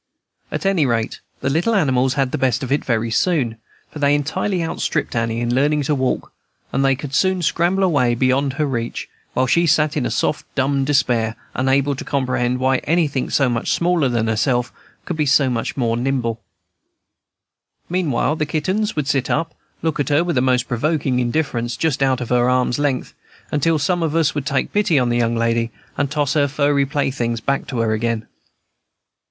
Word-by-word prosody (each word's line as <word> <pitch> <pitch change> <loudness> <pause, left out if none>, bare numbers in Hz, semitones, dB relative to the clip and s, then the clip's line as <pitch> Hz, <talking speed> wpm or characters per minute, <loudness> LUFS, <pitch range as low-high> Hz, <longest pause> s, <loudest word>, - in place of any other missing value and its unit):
At - - -4
any 185 -7 +2
rate, 115 -2 -1 0.2
the - - 0
little 175 +10 +1
animals 130 -7 +2
had 135 -2 0
the - - -2
best 130 0 +1
of 130 - -4
it 145 - +1
very 115 -2 -1
soon; 125 -5 +1 0.3
for 150 - -8
they 145 0 +3
entirely 175 +5 -1
outstripped 160 -3 -2
Annie 115 0 -1
in 120 0 0
learning 145 +3 +2
to 150 - 0
walk, 130 -2 -1 0.4
and 135 - +1
they 135 -1 +3
could 140 0 -7
soon 185 +3 +2
scramble 175 +5 +1
away 135 -10 +2
beyond 130 +2 +1
her 150 +2 0
reach, 120 -4 -3 0.3
while 130 - +2
she 170 +6 +2
sat 150 0 +2
in 145 - 0
a - - -1
sort 150 - 0
of - - -18
dumb 135 0 +1
despair, 120 -5 +1 0.2
unable 135 +2 +1
to - - -6
comprehend 125 -2 0
why 130 +1 +2
anything 150 -4 0
so 135 - +2
much 120 -2 0
smaller 170 -5 +2
than 115 -2 0
herself 120 +2 0 0.3
should 175 - -3
be 150 -2 +1
so 135 -1 +4
much 115 +2 -3
nimbler. 120 -1 0 1.5
Meanwhile, 160 -4 0
the 150 - -1
kittens 190 +8 -1
would 150 -3 -1
sit 135 -3 0
up 165 +1 0
and - - -35 0.3
look 160 -2 -1
at 145 - 0
her 145 +3 +3
with 175 -2 -1
the 125 - +3
most 125 -1 +1
provoking 135 0 0
indifference, 120 -2 -1
just 155 -4 0
out 130 -2 +2
of 120 - -5
arm's 125 +1 +2
length, 140 -3 -1 0.4
until 160 +2 +2
some 175 +4 0
of 160 -1 -1
us 165 -3 +2
would 145 -2 -3
take 140 -1 -1
pity 205 -7 +2
on 125 -2 +2
the 120 - +1
young 115 -1 +1
lady, 115 0 +1 0.3
and 145 -1 0
toss 145 -2 0
her 145 -2 +3
furry 145 0 +1
playthings 130 -5 -1
back 140 +4 -1
to 130 - -4
her 110 -1 +1
again. 115 0 -1
135 Hz, 195 wpm, -20 LUFS, 125-150 Hz, 1.5 s, so